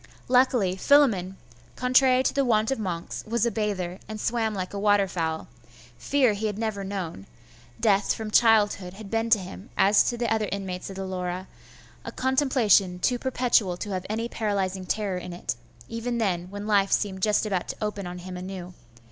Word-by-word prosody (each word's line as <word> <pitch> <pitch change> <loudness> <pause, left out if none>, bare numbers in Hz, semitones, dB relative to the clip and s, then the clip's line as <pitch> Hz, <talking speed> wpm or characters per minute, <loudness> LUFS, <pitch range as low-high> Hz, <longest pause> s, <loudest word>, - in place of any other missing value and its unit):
Luckily 250 -7 +3
Philammon, 195 -8 +3 0.4
contrary 255 0 +4
to - - +1
the 275 - +2
wont 225 -1 +2
of 270 - -1
monks, 175 -5 -4
was 235 0 +1
a 235 - +1
bather, 195 -5 -2
and 215 0 -6
swam 225 -1 0
like 185 0 -4
a 200 - -3
water 205 -1 +3
fowl: 165 -3 -3 0.5
fear 260 - +2
he 215 +2 -2
had 205 -1 -4
never 215 -3 -2
known: 185 - -5 0.5
death 205 -3 +2
from 220 -1 -6
childhood 210 -5 +3
had 205 -1 -10
been 225 0 0
to 225 - +6
him, 190 +2 -9
as 200 +1 +5
to 240 - -1
the 235 -1 0
other 215 -2 -1
inmates 190 -2 -4
of 195 - -8
the 195 0 -4
Laura, 185 0 -4 0.6
a - - -6
contemplation 255 -9 +2
too 245 +7 0
perpetual 235 -8 +1
to 205 - -5
have 185 -1 -3
any 225 +2 -2
paralysing 195 -5 -2
terror 200 -2 -1
in 180 0 -7
it, 175 -10 -3 0.3
even 235 +1 -3
then, 180 -6 -1
when 205 +1 -6
life 200 -2 +2
seemed 190 -2 0
just 210 +2 +2
about 190 -4 -1
to - - -4
open 210 -3 -3
on 175 0 -6
him 180 +1 -7
anew. 180 -1 -7
205 Hz, 190 wpm, -26 LUFS, 185-225 Hz, 0.6 s, to